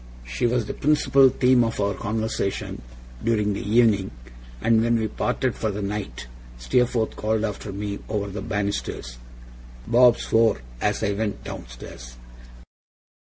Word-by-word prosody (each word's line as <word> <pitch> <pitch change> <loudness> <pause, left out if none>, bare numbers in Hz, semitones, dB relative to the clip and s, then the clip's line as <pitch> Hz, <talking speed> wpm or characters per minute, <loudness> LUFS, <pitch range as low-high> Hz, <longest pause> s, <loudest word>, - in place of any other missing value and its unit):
She 60 - -1
was 120 -1 0
the - - -4
principal 140 -2 +4
theme 125 -1 +4
of 115 0 -2
our 100 0 +1
conversation 110 - -3 0.4
during 105 -3 +1
the 100 - -4
evening: 105 -2 +3 0.5
and 115 - +3
when 120 0 +2
we 110 - 0
parted 130 +3 -1
for 110 - -2
the 105 0 -4
night 100 -12 -4 0.3
Steerforth 115 - +1
called 110 0 0
after 105 -1 -5
me 100 +1 -4
over 105 -2 -1
the 100 +1 -5
banisters, 100 - -3 0.7
'Bob 120 +1 +5
swore!' 110 - +2 0.2
as 105 +1 0
I 100 - +1
went 105 0 -3
downstairs. - - -9
105 Hz, 140 wpm, -24 LUFS, 100-115 Hz, 0.7 s, Bob